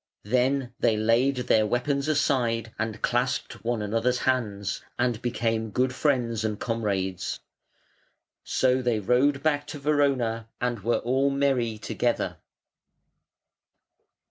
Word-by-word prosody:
Then 125 +3 +1
they 110 - +2
laid 115 +5 +3
their 110 -1 +3
weapons 140 +5 0
aside 120 -7 +1
and 110 -1 -3
clasped 125 +1 -1
one 115 -2 -1
another's 115 +4 +1
hands, 105 -6 -1 0.2
and 120 -2 0
became 115 -2 -1
good 125 +5 0
friends 120 -6 0
and 105 -2 -2
comrades. 100 -5 -2 1.0
So 130 0 +2
they 120 -3 +1
rode 135 +6 +2
back 145 -2 +1
to - - -6
Verona, 135 -6 +1
and 120 -2 -1
were 115 +4 +1
all 130 +3 +1
merry 135 -5 +1
together. 110 - -1
120 Hz, 115 wpm, -26 LUFS, 110-135 Hz, 1.0 s, laid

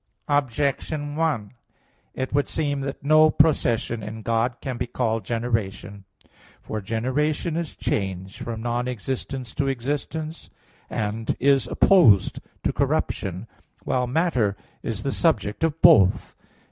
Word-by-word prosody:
Objection 145 +2 0
1: 150 -11 0 0.6
It 130 0 -3
would 145 0 +2
seem 145 -3 -1
that 135 -1 -5
no 155 +2 +6
procession 120 -7 +2
in 110 +1 -7
God 115 +2 +1
can 130 -3 -4
be 125 - -2
called 115 -2 -1
generation. 110 -4 -3 0.5
For 110 - -5
generation 130 - -1
is 170 -2 -3
change 95 -1 -3
from 115 -1 -5
non 120 +1 -1
existence 125 +1 -4
to 140 - -1
existence, 145 +5 -3 0.4
and 110 +1 -2
is 135 +1 +3
opposed 145 - +5 0.2
to - - 0
corruption; 95 +2 -1 0.4
while 125 -1 0
matter 125 - +1 0.2
is 110 -2 -4
the 135 - -1
subject 115 - 0
of 165 -1 0
both. 110 - +5
125 Hz, 125 wpm, -24 LUFS, 110-145 Hz, 0.6 s, no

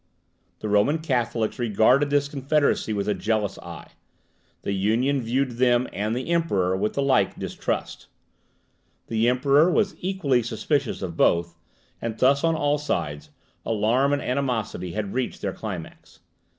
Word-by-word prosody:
The - - -3
Roman 105 +9 +3
Catholics 125 -6 -1
regarded 120 +5 +3
this 145 0 +2
confederacy 140 -3 0
with 100 -2 -2
a 105 - +2
jealous 105 +1 -1
eye; 85 -3 -10 0.7
the - - -2
Union 115 +8 +1
viewed 130 +3 0
them 125 0 +3
and 105 +4 -1
the 130 +7 -3
Emperor 100 - +1
with 105 +3 -1
the 140 - 0
like 135 -1 +2
distrust; - - -4 1.0
the 115 +1 +2
Emperor 140 +6 +4
was 195 +2 +1
equally 175 -10 +1
suspicious 120 +2 -2
of 85 -3 -4
both; 85 0 +2 0.5
and 115 -1 -4
thus, 140 +4 +3
on 165 0 +2
all 145 -1 +1
sides, 75 - -3 0.3
alarm 115 +6 +1
and 145 0 0
animosity 120 -9 -2
had 105 -2 -3
reached 130 0 -2
their 95 -2 -1
climax. 95 -7 -8
120 Hz, 145 wpm, -24 LUFS, 105-140 Hz, 1.0 s, Emperor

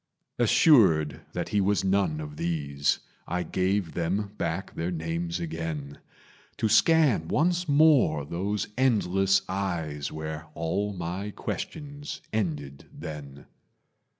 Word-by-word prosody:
Assured 100 - +5
that - - -3
he 105 - +2
was 100 +1 +2
none 95 -5 +1
of 75 -1 -7
these, 70 -4 0 0.3
I 90 +1 -1
gave 95 +1 0
them 95 +4 -1
back 85 +2 -3
their 85 +2 -2
names 85 +1 -3
again, 80 -4 -5 0.6
To 110 - +1
scan 115 - +4
once 175 - +1
more 140 - +4
those 95 +6 -2
endless 95 -6 +3
eyes 85 -7 -3
Where 80 0 -5
all 100 +6 -1
my 90 +3 -4
questions 145 +6 -6
ended 75 -10 -3
then. 70 -3 -8
90 Hz, 115 wpm, -27 LUFS, 80-105 Hz, 0.6 s, Assured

